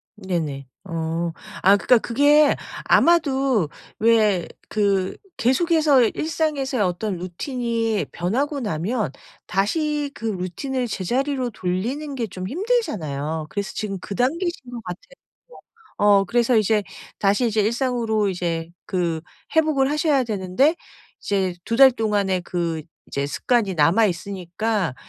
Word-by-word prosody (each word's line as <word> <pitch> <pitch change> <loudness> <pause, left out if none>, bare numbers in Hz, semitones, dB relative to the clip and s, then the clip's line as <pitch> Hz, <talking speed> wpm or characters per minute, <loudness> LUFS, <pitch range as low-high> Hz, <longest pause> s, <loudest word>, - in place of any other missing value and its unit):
네네. 160 -9 -3 0.2
어. 165 -1 -2 0.3
아 195 +2 +7
그러니까 245 +4 +4
그게 290 +5 +4 0.3
아마도 270 - +3 0.3
왜 215 -5 +3 0.3
그 200 -3 +1 0.2
계속해서 295 +2 +3
일상에서의 295 -6 -1
어떤 185 +2 -2
루틴이 225 - -2
변하고 270 - -1
나면 205 - -1 0.4
다시 295 - 0
그 - - -13
루틴을 225 +7 -2
제자리로 255 +6 -1
돌리는 230 +10 -3
게 235 -3 -1
좀 185 0 -6
힘들잖아요. 160 - -2
그래서 200 -1 -4
지금 195 -2 -3
그 195 - -6
단계이신 280 0 -1
것 235 -1 -6
같아요. - - -8 0.9
어 205 -1 +5
그래서 240 +3 +2
이제 215 0 +2 0.4
다시 205 +5 +2
이제 220 -1 0
일상으로 230 -2 0
이제 170 -2 -2 0.2
그 170 -4 -1 0.4
회복을 295 -3 +3
하셔야 300 -3 +2
되는데 215 - +1 0.4
이제 190 -3 0
2 230 - -1
달 265 0 +8
동안에 205 -5 0
그 170 -3 -2 0.3
이제 140 0 -2
습관이 205 - +1
남아 170 +9 +4
있으니까 185 - -2
215 Hz, 270 characters per minute, -22 LUFS, 185-265 Hz, 0.9 s, 달